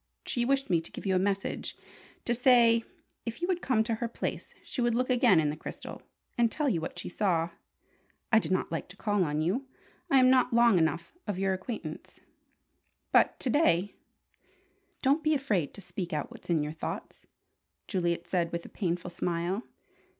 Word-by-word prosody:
She 240 -1 0
wished 275 +1 +1
me 170 -2 +3
to 165 - -9
give - - -8
you 190 - +2
a - - +4
message: 195 +1 -2 0.5
to 240 - +2
say, 235 -2 +5 0.4
if 230 +3 -5
you 350 - -1
would 360 -2 0
come 230 -4 +2
to 230 +1 -1
her 235 - +1
place, 235 - -5
she 255 - -4
would 240 -1 +2
look 255 +1 +1
again 240 -8 +5
in 150 -2 +2
the - - -5
crystal, 155 - -8 0.4
and 235 -1 +4
tell 300 -2 0
you 180 -11 +1
what 160 - -5
she - - -5
saw. 175 -3 0 0.8
I 220 - +7
did 210 - -4
not 185 - 0
like 165 - -3
to 180 - -10
call 205 -3 +1
on 150 -1 -1
you. 215 - -1 0.4
I 275 - +5
am 255 0 +6
not 255 -2 +3
long 235 -5 +6
enough 165 +1 0
of 205 -3 -2
your 190 0 +1
acquaintance. 190 +5 -6 0.9
But - - +4
to 255 - +1
day 205 - +3 0.5
" - - -37
"Don't 280 +4 +3
be 310 0 +3
afraid 210 - 0
to 200 - -8
speak 180 -2 -5
out 150 -2 -2
what's - - -13
in 160 -3 +2
your 150 - -3
thoughts," 160 - -6 0.6
Juliet 170 -3 -1
said 170 -3 0
with 170 0 -4
a - - -9
painful 180 -2 -2
smile. 175 +4 -1
200 Hz, 195 wpm, -29 LUFS, 170-245 Hz, 0.9 s, I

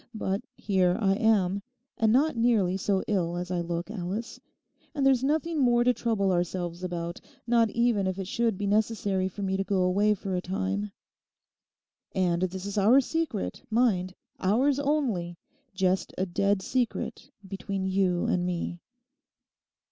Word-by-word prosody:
But 195 -2 -1
here 185 -2 +1
I 195 -3 +3
am; 200 -3 +2 0.3
and 220 -1 +2
not 285 +6 +3
nearly 225 -6 +2
so 195 0 0
ill 175 -4 0
as 180 +1 -4
I 175 -1 0
look, 170 +3 -4
Alice; 205 +3 -4 0.6
and 280 -2 +1
there's 265 -2 +4
nothing 310 +3 0
more 240 -2 +4
to 250 +1 +4
trouble 220 -5 0
ourselves 175 0 -2
about; 170 -1 -4 0.2
not 235 -1 +3
even 230 -4 +1
if 185 0 -2
it 195 - -4
should 230 0 0
be 205 - -3
necessary 205 -2 +1
for 200 +2 -6
me 190 0 0
to 195 - 0
go 195 -2 +1
away 205 +3 +3
for 190 -1 -4
a 180 - -1
time. 195 +2 -2 1.2
And 175 -2 +1
this 185 +1 -2
is 200 +1 -1
our 225 +7 +6
secret, 275 - -2
mind; 205 -6 +1 0.2
ours 255 +9 +2
only; 245 - -1 0.4
just 185 0 0
a 190 - 0
dead 195 +2 0
secret 255 +2 -2 0.2
between 195 0 -4
you 185 -2 +1
and 180 - +1
me. 175 -1 -3
195 Hz, 155 wpm, -27 LUFS, 185-230 Hz, 1.2 s, our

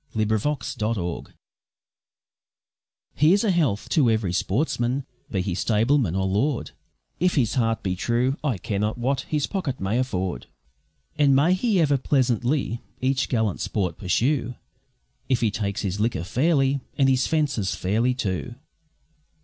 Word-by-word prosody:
A - - -4
Hunting 110 +7 +1
Song 110 -9 -3 1.9
Here's 175 +8 +4
a 215 - +2
health 145 - +1
to 145 -8 +3
every 110 -5 0
sportsman, 125 - 0 0.2
be 95 - -1
he 90 -1 -2
stableman 110 - +1
or 95 0 0
lord, 115 +8 0 0.5
If 180 +1 +2
his 120 -7 +2
heart 115 -4 0
be 95 -1 -1
true, 120 +7 0
I 135 -9 0
care 100 +2 -3
not 105 +3 -1
what 130 +2 0
his 150 -2 +1
pocket 155 -10 -3
may 100 +6 0
afford; 95 -8 -2 0.7
And 140 -2 +5
may 155 +7 +4
he 200 +1 +1
ever 145 -4 +3
pleasantly 125 -1 0 0.2
each 130 +1 0
gallant 110 -6 0
sport 95 -3 -2
pursue, 120 - 0 0.7
If 130 -3 +2
he 110 -3 +2
takes 100 -1 -3
his 100 0 -2
liquor 105 -7 0
fairly, 135 - +2 0.2
and 135 - +4
his 130 -1 +2
fences 145 -11 0
fairly, 115 +7 0
too. 110 0 -3
120 Hz, 145 wpm, -24 LUFS, 105-140 Hz, 1.9 s, And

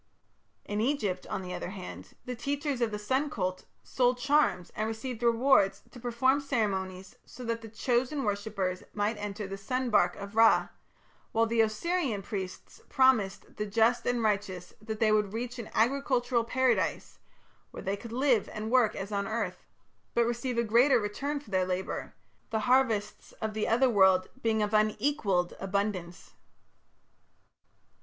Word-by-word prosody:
In 210 +1 -2
Egypt, 215 -8 -1
on - - -3
the 180 0 -6
other - - -4
hand, 185 -2 -9
the 250 - -4
teachers 280 +1 -2
of 235 - +2
the 210 - -4
sun 260 +8 0
cult 185 -8 -3 0.2
sold 250 -1 +1
charms 245 - +2
and 215 - -1
received 225 +2 -5
rewards 230 -4 +3
to 245 - -11
perform 250 +3 +2
ceremonies 190 -8 -2
so 250 0 -10
that 230 -1 -4
chosen 255 +4 0
worshippers 200 -3 -2
might 210 +1 0
enter 205 0 -4
the 195 0 -6
sun 255 +4 -2
barque 180 -4 +3
of 200 +1 -8
Ra; 225 0 +5 0.6
while 225 0 +3
the 230 0 +2
Osirian 225 - 0
priests 190 -3 -6
promised 255 -8 +2
the 210 0 -2
just 230 +4 +2
and 245 -1 +1
righteous 200 -4 -1
that 215 0 -5
they 220 -1 +3
would 210 -2 +2
reach 245 +2 -4
an 225 - -6
agricultural 245 -1 +2
Paradise 260 +2 0 0.5
where - - -9
they 195 +1 -1
could 230 +2 -10
live 250 -3 +2
and 215 +1 -5
work 245 -4 +4
as 195 +2 -5
on 200 -1 -1
earth, 210 -5 -3 0.5
but 235 - +4
receive 240 +1 -2
a 235 - +3
greater 240 +4 +4
return 275 +8 -3
for 250 -7 -16
their 185 -1 +2
labour, 185 +1 -3 0.3
the 220 -1 -1
harvests 230 -4 +1
of 220 -1 -4
the 215 0 -1
Otherworld 200 -7 +4
being 220 -1 +1
of 210 +1 -2
unequalled 215 -4 +1
abundance. 195 -3 -3
220 Hz, 155 wpm, -29 LUFS, 200-245 Hz, 0.6 s, Ra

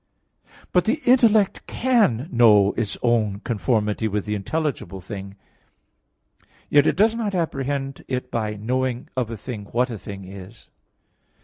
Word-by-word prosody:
But 180 -1 +3
the 245 +7 +1
intellect 225 -5 +4
can 215 - +2
know 105 -5 +5
its 110 -4 -3
own 110 -5 +1
conformity 105 0 0
with 105 -1 -2
the 105 - -2
intelligible 105 - -3
thing; 95 +1 -8 1.4
yet 145 0 +5
it - - +2
does 220 +4 +4
not 220 -4 -2
apprehend 135 -4 -2
it 125 -1 -3
by 110 -2 -2
knowing 125 +3 -2
of 125 -4 -1
a 115 - -5
thing 105 -1 -7
"what 125 +4 0
a 110 - -6
thing 100 -1 -8
is." 95 +3 -12
120 Hz, 140 wpm, -23 LUFS, 105-145 Hz, 1.4 s, know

